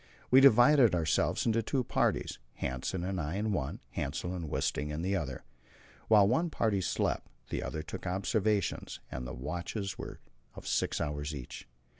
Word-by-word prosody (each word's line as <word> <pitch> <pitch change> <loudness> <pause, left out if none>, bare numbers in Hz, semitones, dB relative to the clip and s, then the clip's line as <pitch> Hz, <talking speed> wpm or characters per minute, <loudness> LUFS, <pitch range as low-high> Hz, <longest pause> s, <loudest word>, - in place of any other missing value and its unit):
We 130 +1 +8
divided 125 -3 +7
ourselves 80 -2 +1
into 115 0 +2
two 125 +4 0
parties - - 0 0.2
Hanssen 85 +8 -2
and 95 -2 -2
I 75 +4 -3
in 105 +2 0
one, 75 -9 -2
Hassel 90 - -3
and 85 -4 -4
Wisting 75 +2 -1
in 75 +2 -3
the 95 +2 +1
other. 70 -8 -3 0.6
While 105 -3 +6
one 160 +10 +2
party 110 -9 +1
slept, - - -1 0.2
the - - -1
other 80 - -4
took - - -7
the 90 - -3
observations, 100 - 0
and 60 0 -4
the - - -6
watches 90 - -4
were - - -7 0.4
of - - -10
six - - 0
hours 75 0 -2
each. 65 -4 -8
95 Hz, 170 wpm, -31 LUFS, 75-110 Hz, 0.6 s, We